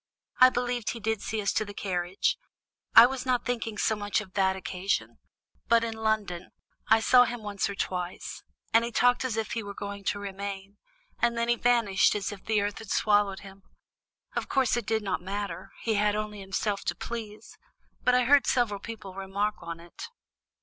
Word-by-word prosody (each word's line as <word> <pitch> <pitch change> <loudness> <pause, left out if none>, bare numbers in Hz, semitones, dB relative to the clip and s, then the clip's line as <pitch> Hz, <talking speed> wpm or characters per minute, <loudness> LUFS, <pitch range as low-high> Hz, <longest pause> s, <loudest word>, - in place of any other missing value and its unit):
"I 255 - +9
believe 245 -1 -2
he 235 - -4
did 220 -1 -1
see 215 0 -3
us 200 - +1
to - - +1
the 205 -1 -9
carriage; 180 -1 -1 0.6
I 230 - +12
was 260 0 -2
not 250 -2 0
thinking 230 -3 -2
so 220 - +1
much 205 -1 -1
of 195 -3 -9
that 190 -1 +2
occasion. 190 +1 -3 0.5
But 230 0 +4
in 230 -1 -2
London 215 -5 -2 0.4
I 225 - +6
saw 250 +2 +6
him 240 -2 -5
once 205 -2 -2
or 200 - -5
twice, 180 -2 -4 0.3
and 230 +1 +6
he 235 - -3
talked 245 +2 +3
as 245 -4 -2
if 220 -1 -2
he 230 - -2
were 200 -1 -8
going 200 0 -6
to 205 - 0
remain, 200 0 -6 0.4
and 235 -1 +1
then 235 0 0
he 240 - +4
vanished 230 -6 +3
as 205 -1 -2
if 200 -2 -9
the 215 -2 +1
earth 205 0 -2
had 220 - -10
swallowed 205 -2 +2
him. 195 0 -13 0.7
Of - - -2
course, 260 -4 +2
it 240 -3 -3
did 220 -1 0
not 195 -3 -2
matter; 200 +2 -5
he 225 - +1
had 210 0 +2
only 210 -1 -4
himself 200 +1 -2
to - - -1
please; 220 -2 -7 0.4
but 250 - +4
I 250 - +4
heard 280 +3 +5
several 225 -5 +1
people 200 -3 -8
remark 195 +2 -2
on 170 0 -6
it." 170 0 -10
210 Hz, 200 wpm, -28 LUFS, 195-230 Hz, 0.7 s, I